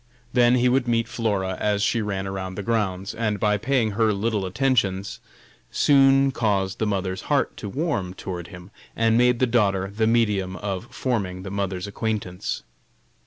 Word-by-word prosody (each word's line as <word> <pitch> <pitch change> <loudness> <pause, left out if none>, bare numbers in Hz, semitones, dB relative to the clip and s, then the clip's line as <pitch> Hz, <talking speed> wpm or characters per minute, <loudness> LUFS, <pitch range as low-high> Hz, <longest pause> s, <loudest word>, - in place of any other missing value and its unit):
Then 120 0 +5
he 125 0 +3
would 125 0 +2
meet 115 -1 +1
Flora 100 -5 -1
as 105 -1 +1
she 115 +2 +1
ran 100 -2 -3
around 95 -1 -5
the 100 - -4
grounds, 100 -4 -1
and 105 -3 -1
by 105 -1 +2
paying 120 0 +1
her 110 +1 +2
little 105 -1 -1
attentions, 100 -4 0 0.5
soon 135 -1 +4
caused 100 -6 0
the 110 - 0
mother's 95 -2 -2
heart - - +1
to 100 - -6
warm 100 - -2
toward 90 -3 -6
him, 90 +1 -12 0.2
and 115 0 +2
made 125 +1 +4
the 130 - +3
daughter 100 -5 +1
the 110 0 +2
medium 105 -5 +1
of 95 +1 -4
forming 110 -9 -2
the 95 - -6
mother's 95 -2 -2
acquaintance. 100 -3 -3
105 Hz, 165 wpm, -24 LUFS, 95-115 Hz, 0.5 s, Then